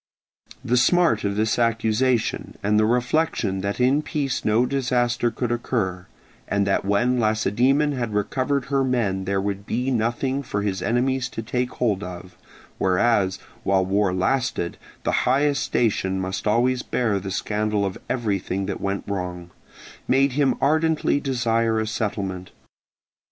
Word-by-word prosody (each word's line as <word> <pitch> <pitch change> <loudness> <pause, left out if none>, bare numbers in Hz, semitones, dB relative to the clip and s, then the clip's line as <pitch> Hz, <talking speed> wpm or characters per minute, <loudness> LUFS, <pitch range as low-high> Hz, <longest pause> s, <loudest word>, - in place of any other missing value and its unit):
The 125 - +2
smart 135 -3 +3
of 100 0 -1
this 110 +2 +1
accusation, 115 +1 0
and 105 +1 +3
the 110 - +3
reflection 120 -5 0
that 100 +3 -3
in 130 +4 +3
peace 145 -3 -2
no 110 +3 +3
disaster 120 -2 +1
could 120 0 -3
occur, 95 -7 -2 0.4
and 100 0 +1
that 100 - +1
when 120 +6 +1
Lacedaemon 120 +7 +2
had 120 -5 -3
recovered 130 +6 0
her 140 -1 +1
men 110 -7 0
there 95 +1 0
would 100 0 -3
be 125 +3 -1
nothing 125 +3 0
for 100 -6 -3
his 95 -3 -2
enemies 125 +3 0
to 115 - -6
take 125 +2 -1
hold 105 -6 0
of 90 0 -8 0.4
(whereas, 95 0 +2 0.2
while 95 -4 +2
war 100 0 +1
lasted, 95 -1 -1 0.3
the - - 0 0.2
highest 140 +2 +2
station 95 -5 0
must 95 +2 -3
always 125 +4 +2
bear 110 -6 0
the 95 +1 -6
scandal 105 +1 -1
of 95 - -4
everything 100 -5 -1
that 95 -1 -4
went 100 0 -2
wrong), 90 -3 -5 0.6
made 135 +1 +3
him 140 +1 +2
ardently 155 0 +2
desire 115 -5 +1
a 110 - 0
settlement. 100 -4 -3
115 Hz, 145 wpm, -23 LUFS, 100-125 Hz, 0.6 s, smart